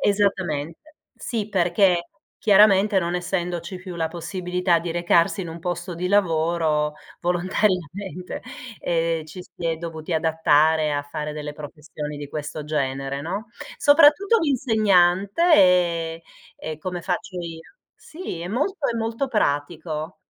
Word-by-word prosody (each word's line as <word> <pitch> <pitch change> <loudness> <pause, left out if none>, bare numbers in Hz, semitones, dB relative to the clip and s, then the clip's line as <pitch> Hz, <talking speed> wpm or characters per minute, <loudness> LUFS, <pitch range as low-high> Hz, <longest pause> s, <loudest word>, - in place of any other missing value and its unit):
Esattamente. 195 - -1 0.2
Sì, 225 -5 -3
perché, 180 -2 +2 0.3
chiaramente 205 -1 +5
non 175 -1 -1
essendoci 180 0 -3
più 180 0 -8
la 165 -1 -1
possibilità 180 0 -1
di 170 +1 -5
recarsi 175 +3 +2
in 175 - -5
un 165 +1 -7
posto 175 +1 -4
di 180 +2 -3
lavoro, 160 -5 +1 0.3
volontariamente, 180 0 -1 0.4
ehm, 165 -1 0
ci 155 +4 -10
si 170 - -7
è 165 -1 0
dovuti 165 0 -6
adattare 160 -1 +3
a 145 0 -1
fare 150 +1 -5
delle 150 -1 -6
professioni 150 0 -7
di 145 -1 -7
questo 150 +1 -5
genere, 140 -2 -2
no, 195 +8 -4 0.3
soprattutto 305 +9 +5
l'insegnante, 215 - +3
e 170 - +3 0.3
e 155 -1 -6
come 180 +2 -4
faccio 180 +1 -3
io. 165 -1 -8 0.2
Sì, 315 - -8
è 175 - -5
molto 295 - -1
è - - -4
molto 230 +4 -2
pratico. 155 - -2
175 Hz, 130 wpm, -23 LUFS, 160-195 Hz, 0.4 s, chiaramente